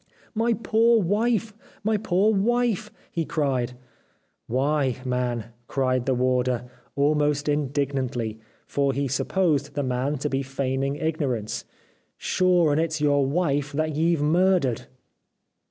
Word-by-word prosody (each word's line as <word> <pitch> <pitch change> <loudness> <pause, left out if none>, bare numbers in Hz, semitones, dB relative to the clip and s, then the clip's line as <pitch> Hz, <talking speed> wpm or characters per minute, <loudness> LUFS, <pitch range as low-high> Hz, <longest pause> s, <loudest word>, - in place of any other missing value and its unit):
* - - -30
My 235 0 +3
poor 230 +1 +3
wife! 215 +3 +1 0.3
My 220 +1 +2
poor 205 +1 +2
wife! 235 +1 +1
' - - -31
he 165 - -1
cried. 135 -6 -1 0.4
' - - -45
Why, 140 -2 +1
man! 125 -2 -2
' 120 0 -39
cried 130 -2 0
the 130 - +2
warder, 125 -1 +1 0.3
almost 145 0 +1
indignantly, 135 -6 -1 0.3
for 140 -1 0
he 140 +1 -1
supposed 145 +1 0
the 145 - 0
man 130 +3 -1
to 145 - -2
be 135 -1 -1
feigning 135 0 -2
ignorance, 145 -9 -2 0.3
' - - -41
sure 180 -4 +2
and 150 +2 +2
it's 160 -1 -1
your 145 -1 +3
wife 145 -2 0
that 155 0 -1
ye've 165 -1 +2
murdered.' 170 - +2
145 Hz, 140 wpm, -25 LUFS, 130-170 Hz, 0.4 s, My